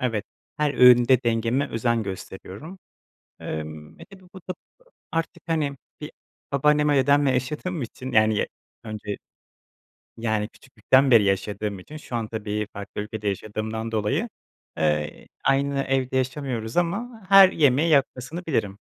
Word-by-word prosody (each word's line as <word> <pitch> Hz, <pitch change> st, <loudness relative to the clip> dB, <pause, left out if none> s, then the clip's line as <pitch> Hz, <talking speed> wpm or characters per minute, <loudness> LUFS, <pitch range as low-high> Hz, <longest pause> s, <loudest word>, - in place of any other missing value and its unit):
Evet, 115 Hz, -5 st, -1 dB, 0.3 s
her 150 Hz, -1 st, 0 dB
öğünde 125 Hz, 0 st, +6 dB
dengeme 120 Hz, +4 st, 0 dB
özen 115 Hz, 0 st, 0 dB
gösteriyorum. 100 Hz, -, -8 dB, 0.6 s
Emm, 80 Hz, 0 st, -7 dB
e, -, -, -10 dB
tabii, 195 Hz, -1 st, -16 dB
bu 190 Hz, -, -9 dB
da 185 Hz, -, -5 dB, 0.6 s
artık 165 Hz, 0 st, -3 dB
hani 150 Hz, -4 st, -1 dB, 0.2 s
bir -, -, -6 dB, 0.4 s
babaannem 150 Hz, +2 st, +3 dB
ve 145 Hz, -, +3 dB
dedemle 140 Hz, +1 st, +4 dB
yaşadığım 150 Hz, +6 st, -2 dB
için 130 Hz, +2 st, -7 dB
yani 110 Hz, 0 st, +4 dB
ya -, -, 0 dB, 0.4 s
önce 105 Hz, -2 st, -5 dB, 1.0 s
Yani 110 Hz, -2 st, -1 dB
küçüklükten 130 Hz, +1 st, +1 dB
beri 115 Hz, -4 st, +7 dB
yaşadığım 100 Hz, +1 st, -1 dB
için 145 Hz, +12 st, -11 dB
şu 130 Hz, -5 st, -6 dB
an, 115 Hz, -, -2 dB
tabii, 105 Hz, -1 st, -3 dB
farklı 100 Hz, 0 st, -6 dB
ülkede 105 Hz, 0 st, -4 dB
yaşadığımdan 110 Hz, +3 st, -4 dB
dolayı, 110 Hz, -, 0 dB, 0.5 s
eee, 75 Hz, -1 st, -1 dB, 0.2 s
aynı 140 Hz, 0 st, +2 dB
evde 130 Hz, -1 st, -1 dB
yaşamıyoruz 130 Hz, -4 st, -2 dB
ama 220 Hz, +7 st, -1 dB
her 195 Hz, -1 st, +9 dB
yemeği 150 Hz, +2 st, +3 dB
yapmasını 140 Hz, +3 st, 0 dB
bilirim. 105 Hz, -10 st, -1 dB
125 Hz, 135 wpm, -24 LUFS, 105-145 Hz, 1.0 s, her